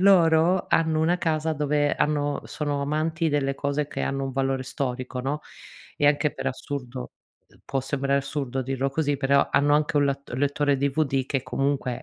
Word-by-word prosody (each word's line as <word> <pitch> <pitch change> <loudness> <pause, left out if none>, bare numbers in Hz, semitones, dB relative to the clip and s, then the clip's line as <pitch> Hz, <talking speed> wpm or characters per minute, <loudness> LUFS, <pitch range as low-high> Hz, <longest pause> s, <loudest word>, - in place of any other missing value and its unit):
loro 175 -2 +5
hanno 160 -1 +2
una 175 +3 +2
casa 160 -1 0
dove 145 -1 +1
hanno 145 -1 0
sono 145 -2 -2
amanti 155 +3 0
delle 140 -2 0
cose 140 +1 -1
che - - -5
hanno 135 0 -1
un 135 - -4
valore 135 0 0
storico, 130 -1 -3
no, 140 +4 -2 0.6
e 145 - +2
anche 145 0 +3
per - - -5
assurdo, 130 -2 -6 0.5
può 135 - -1
sembrare 140 +1 0
assurdo 135 -2 -3
dirlo 135 +1 -1
così, 145 -1 0
però 140 0 +3
hanno 145 +1 +3
anche 150 0 +1
un 145 - +4
lat 140 0 -3
lettore 145 +1 +1
DVD 135 -1 0
che 135 -2 -1
comunque 130 -1 -1
140 Hz, 170 wpm, -25 LUFS, 135-150 Hz, 0.6 s, loro